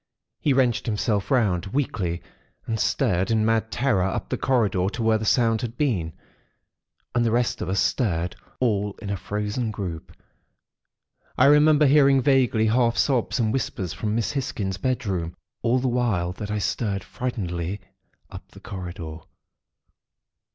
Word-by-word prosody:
He 145 - +1
wrenched 130 -4 +2
himself 105 -2 0
round, 105 -10 +1
weakly, 95 -8 -2 0.4
and 110 -1 -2
stared 95 +1 +1
in 110 -1 +2
mad 110 0 +1
terror 120 -5 +1
up 95 - -3
the - - 0
corridor 105 -8 +1
to 115 +2 -4
where 110 -1 +3
the 110 - -4
sound 115 -1 +2
had 120 0 -5
been; 95 - 0 1.0
and 120 - +2
the 115 - +2
rest 120 +1 0
of 90 - -3
us 95 0 +1
stared, 90 -7 0 0.2
all 105 -5 0
in 100 -2 -5
a - - 0
frozen 105 +4 -3
group. 95 -7 -6 1.3
I - - +5
remember 150 +1 +6
hearing 140 -1 +5
vaguely, 130 -4 +3
half 115 +1 +2
sobs 130 -4 +1
and 110 -2 +1
whispers 115 - -2
from 105 -1 -2
Miss 115 -2 0
Hisgins' 105 -9 -3
bedroom, 95 -10 -2 0.3
all 120 +2 +2
the 130 +1 0
while 115 -8 0
that 100 +3 -7
I 105 - -1
stared, 100 -1 -1
frightenedly, 100 -7 -4 0.5
up - - -10
the - - -14
corridor. 85 -4 -7
110 Hz, 150 wpm, -24 LUFS, 95-125 Hz, 1.3 s, remember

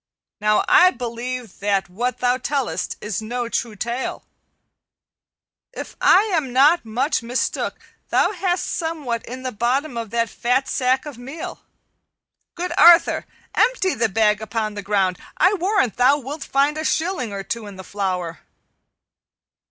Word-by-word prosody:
"Now 210 0 +2
I 365 - +7
believe 245 - -5
that 200 -1 0
what 240 +8 -2
thou 250 +1 +1
tellest 275 -3 -2
is 210 0 -3
no 240 +2 -3
true 230 -1 -2
tale. 235 +5 -3 1.5
If - - -7
I 385 - +6
am 300 -7 0
not 290 +7 +5
much 255 +7 0
mistook 240 +2 -2 0.3
thou - - +3
hast 365 -2 -1
somewhat 305 -9 -3
in 255 +2 -7
the 255 - -3
bottom 245 +4 -1
of 230 -2 -4
that 230 +1 0
fat 250 +5 0
sack 260 +1 +1
of 285 -5 -8
meal. 275 +6 -7 0.9
Good 355 0 -3
Arthur, 345 -1 +6 0.3
empty 445 -5 +2
the 225 0 0
bag 210 +1 +2
upon 220 -1 -2
the 205 - -5
ground; 195 -2 0 0.2
I 375 - +4
warrant 385 - +1
thou 260 +3 +5
wilt 285 +2 -6
find 285 +3 +1
a - - -2
shilling 320 - -1
or 200 -1 -5
two 230 0 -4
in 200 - -9
the 190 - -9
flour." 180 -5 -3
245 Hz, 150 wpm, -21 LUFS, 215-295 Hz, 1.5 s, I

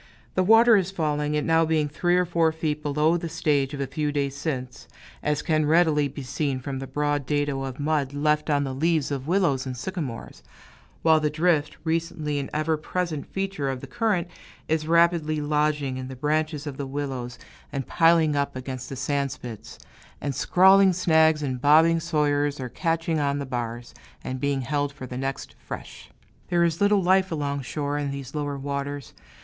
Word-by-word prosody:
The 185 - +2
water 225 +4 +6
is 190 -2 0
falling, 150 -4 -1
it 150 - 0
now 165 0 +4
being 155 -2 +1
three 175 +4 +1
or 180 - +3
four 165 -2 +2
feet 155 -1 -2
below 150 +3 +2
the 170 -1 -5
stage 145 -4 0
of - - -8
a 140 - 0
few 150 +3 -2
days 140 -1 -1
since, 135 -3 -5 0.3
as 150 0 -1
can 155 -2 +1
readily 155 -2 +3
be 140 0 -8
seen 135 +1 -2
from 135 0 -5
the 135 - -6
broad 145 0 -1
dado 145 -2 0
of 135 0 -5
mud 145 -2 0
left 150 +2 0
on 145 -1 +2
the 135 -1 -3
leaves 155 +1 +1
of 135 0 -3
willows 165 -8 +1
and 130 -1 -5
sycamores; 150 -6 -5 0.6
while 160 -1 +5
the 150 -1 +1
drift, 155 -1 +1
recently 160 -3 -1
an 140 - -4
ever 155 +1 0
present 160 -1 -3
feature 195 -8 -3
of 130 -1 -3
the - - -8
current, 215 -7 0 0.4
is 155 -1 0
rapidly 170 -2 +3
lodging 150 -2 0
in 130 0 -5
the 130 - -7
branches 150 +2 -1
of 140 -3 -6
the 140 - -4
willows 135 -3 -4 0.3
and 135 -2 -3
piling 165 -2 +3
up 140 -2 -1
against 130 0 -6
the 135 - -5
sand 140 +1 -1
spits; 120 -4 -9 0.4
and 140 0 -3
scrawling 190 +5 +5
snags 160 -3 +3
and 130 -3 -3
bobbing 160 +3 +5
sawyers 145 -3 0
are 130 -1 -4
catching 165 +1 -1
on 140 -1 0
the 140 - -3
bars, 120 -2 -5 0.3
and 130 0 -4
being 140 0 0
held 145 +2 -1
for 140 -2 -9
the 125 - -7
next 135 +1 -4
"fresh." - - -9 0.4
There 175 -1 +2
is 170 0 0
little 205 -1 +4
life 190 +1 +3
along 140 -3 -2
shore, 145 +3 -3
in 145 -1 -2
these 140 -1 -6
lower 145 -2 -3
waters. 140 -1 -4
150 Hz, 190 wpm, -25 LUFS, 140-165 Hz, 0.6 s, water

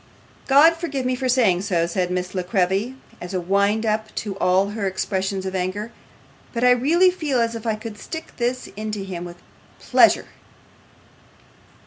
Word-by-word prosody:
'God 295 +5 +6
forgive 290 -6 -4
me 255 0 +1
for 255 +1 -2
saying 220 -8 +3
so,' 180 -4 0
said 180 +1 -1
Miss 180 0 -3
La 185 - -1
Creevy, 190 +5 0 0.3
as 175 +2 -6
a - - +1
wind 200 +5 +1
up 215 0 0
to 205 -3 -4
all 185 +2 +2
her 205 -1 -3
expressions 190 0 -2
of 190 - -4
anger, 190 +4 -3 0.6
'but 235 0 -2
I 250 - +6
really 325 +9 +4
feel 300 -8 -1
as 230 0 +1
if 230 0 -6
I 220 - +1
could 215 -1 -8
stick 320 +8 -8
this 245 +1 -1
into 210 -1 -4
him 180 -2 -6
with 175 0 -9 0.4
pleasure. - - +4
210 Hz, 170 wpm, -22 LUFS, 185-250 Hz, 0.6 s, God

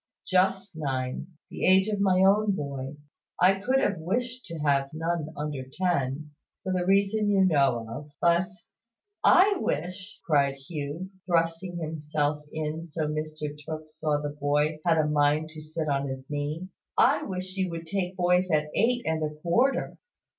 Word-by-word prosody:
"Just 190 0 +1
nine; 130 -4 -3 0.2
the - - -6
age 190 +2 +5
of 210 -2 -1
my 190 -2 +3
own 205 +1 +4
boy. 140 -3 -5 0.4
I 190 +2 +5
could 255 +7 +2
have 205 -9 0
wished 245 +9 -2
to 165 - -7
have 140 -2 +1
none 165 -1 -2
under 145 -2 -3
ten, 150 -4 -1 0.3
for 190 - -1
the 180 -1 0
reason 200 +2 +3
you 195 -2 +4
know 140 -9 +3
of. 145 +6 -7
But 170 +2 +3 0.5
" 410 - -57
"I 395 +2 +6
wish," 185 +6 -3
cried 140 -3 +3
Hugh, 150 +5 -6 0.2
thrusting 170 +1 0
himself 150 -2 -2
in 155 +1 -4
so 160 0 -5
that 150 0 -1
Mr 155 -1 -4
Tooke 155 0 -6
saw 155 -1 0
the 145 0 -3
boy 150 +1 0
had 165 -2 +3
a 155 - +3
mind 150 +1 +2
to 155 -1 -9
sit 155 +1 -4
on 140 -1 0
his 130 0 -6
knee, 150 +5 -3 0.3
"I - - +5
wish 185 -1 -5
you 190 -1 0
would 165 -1 -6
take 185 +1 -2
boys 180 +1 +3
at 150 -2 +1
eight 240 +2 +2
and 160 0 0
a 150 0 -2
quarter." 240 +11 +1
160 Hz, 170 wpm, -27 LUFS, 150-185 Hz, 0.5 s, I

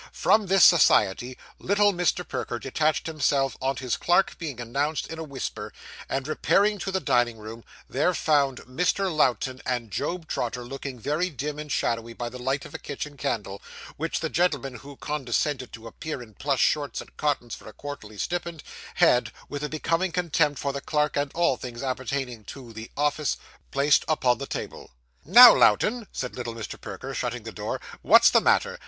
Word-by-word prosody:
From 215 -2 +3
this 195 0 +5
society, 125 - +5 0.2
little 205 +1 +3
Mr. 180 0 0
Perker 120 - -3
detached 150 +5 0
himself, 140 -4 0
on 135 +1 0
his 125 -2 -2
clerk 175 +2 +2
being 145 -8 -5
announced 140 +6 -1
in 165 0 -8
a - - -4
whisper; 140 -4 -5 0.4
and 135 0 -2
repairing 200 +6 +2
to 195 - -3
the 190 - 0
dining 120 -8 +1
room, 110 +2 -9 0.2
there 160 +7 +1
found 140 -5 +1
Mr. 180 +7 -1
Lowten 130 -2 +1
and 120 -4 -3
Job 165 - -3
Trotter 125 -2 -3
looking 135 0 -7
very 150 +10 -1
dim 150 0 -5
and 150 -1 -7
shadowy 115 -1 -1
by 120 0 -5
the 125 +1 -9
light 135 +2 -1
of - - -12
a - - -5
kitchen 145 +1 -6
candle, 105 -9 -3 0.3
which - - -3
the - - -1
gentleman 145 -7 0
who 140 +5 -12
condescended 135 -2 -2
to 115 0 -10
appear 140 +6 -6
in 110 -2 -16
plush 135 +2 -1
shorts 145 -2 +1
and - - -11
cottons 140 -6 -1
for - - -9
a - - -13
quarterly 110 -8 -8
stipend, 170 - -3 0.3
had, 125 - +4 0.2
with 145 0 -5
a 150 - -2
becoming 165 +4 0
contempt 165 -4 +1
for 140 -1 -2
the 140 - -4
clerk 150 0 0
and 145 -1 -1
all 170 -6 +2
things 120 0 -7
appertaining 130 -2 -3
to 120 +2 -10
'the 110 +1 -8
office,' 150 0 0 0.3
placed 140 +2 +3
upon 130 -6 +2
the 140 - -5
table. - - -6 0.4
'Now, 235 - +11
Lowten,' 230 -1 +3
said 125 - -5
little 120 -2 -5
Mr. 115 -2 -7
Perker, - - -7
shutting - - -3
the - - -7
door, - - -4 0.2
'what's - - +7
the - - +5
matter? - - +2
140 Hz, 185 wpm, -26 LUFS, 125-160 Hz, 0.4 s, Now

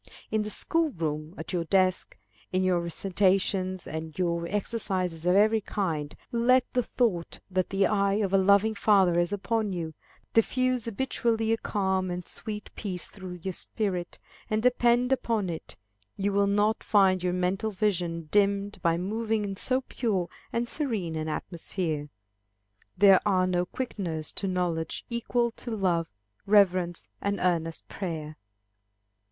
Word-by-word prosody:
In 220 - +2
the 210 - -3
school 325 +8 0
room, 155 - -4
at - - -6
your 175 -2 0
desk, 185 +1 +1 0.3
in 185 0 +1
your 185 -2 +3
recitations, 185 +1 +1
and 160 0 -6
your 170 -2 0
exercises 185 -4 -2
of 180 - +4
every 215 +2 +4
kind, 160 -8 -2 0.2
let 245 +2 +4
the 250 - +3
thought 220 -8 -1
that 185 -1 0
the 195 0 +2
eye 200 -2 +2
of 200 -2 0
a - - +6
loving 200 +3 +4
Father 195 -4 +4
is 175 +1 +1
upon 210 0 -1
you, 165 -3 -4 0.4
diffuse 255 +1 +2
habitually 230 -1 0
a 225 - +3
calm 190 -3 0
and 180 0 -4
sweet 210 -2 -5
peace 185 -5 -4
through 185 -3 -8
your 190 - -2
spirit, 180 -3 -3 0.3
and 215 0 0
depend 245 0 +3
upon 225 -8 0
it, 160 - -7 0.4
you 200 0 0
will 200 0 +3
not 205 +2 +2
find 190 -3 +4
your 180 -1 +1
mental 185 +4 0
vision 180 -5 -1
dimmed 200 -1 +2
by 170 -1 +2
moving 215 +3 -1
in 195 -1 -4
so 255 +6 0
pure 210 -9 -1 0.2
and 235 +1 -1
serene 220 - -2
an 155 0 -3
atmosphere. 160 -2 -3 0.9
There 195 -1 +7
are 185 -3 +3
no 180 -1 0
quickeners 175 -11 -3
to 195 - 0
knowledge 175 -3 -2
equal 235 0 0
to 245 - -5
love, 180 -7 +1 0.4
reverence, 185 -4 +3
and 200 0 -1
earnest 165 -2 -1
prayer. 155 -5 -5
195 Hz, 150 wpm, -28 LUFS, 175-215 Hz, 0.9 s, There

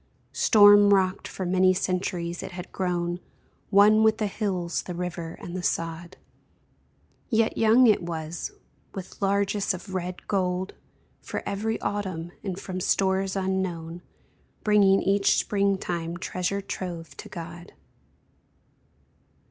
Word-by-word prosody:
Storm 205 -2 +7
rocked 190 -1 0
for 185 - -5
many 185 +1 +3
centuries, 180 -2 -2
it - - -7
had 180 0 -8
grown 175 -1 -2 0.5
One 210 +2 +6
with 220 0 +4
the 215 - -1
hills, 190 -4 -2
the 180 - -7
river 170 -2 -5
and 175 - -7
the 185 - -3
sod; 165 0 -3 1.1
Yet 225 -2 +2
young 225 +3 +5
it 215 -5 +4
was, 170 - -5 0.4
with 190 +1 -8
largess 200 0 +1
of 190 +2 -10
red 180 -1 -4
gold 185 -1 -1 0.5
For - - -5
every 215 +3 -2
autumn, 190 -5 -3
and 190 -2 -4
from 185 -2 -5
stores 190 +1 +1
unknown 185 -3 -2 0.6
Bringing 200 -2 +4
each 200 +1 +3
springtime 190 -4 -1
treasure 185 +3 -2
trove 175 -4 -6
to - - -9
God. 170 +1 -9
185 Hz, 125 wpm, -26 LUFS, 175-200 Hz, 1.1 s, Storm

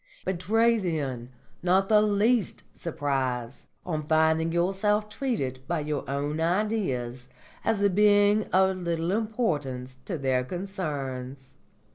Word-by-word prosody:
Betray, 225 +6 +2
then, 140 - -3 0.3
not 185 +2 +3
the 210 0 +5
least 215 +1 +1
surprise 135 -6 -3 0.2
on 155 -3 -3
finding 160 +1 +3
yourself 195 +5 +1
treated 210 - -2
by 170 -2 -1
your 150 -2 -3
own 145 +3 -2
Ideas 165 - -1 0.3
as 220 -3 +1
a 200 - +5
being 205 +1 +4
of 190 0 +2
little 170 -1 -1
importance 150 - -2
to 180 - -3
their 130 -2 +1
concerns. 135 -7 -5
170 Hz, 115 wpm, -27 LUFS, 135-205 Hz, 0.3 s, the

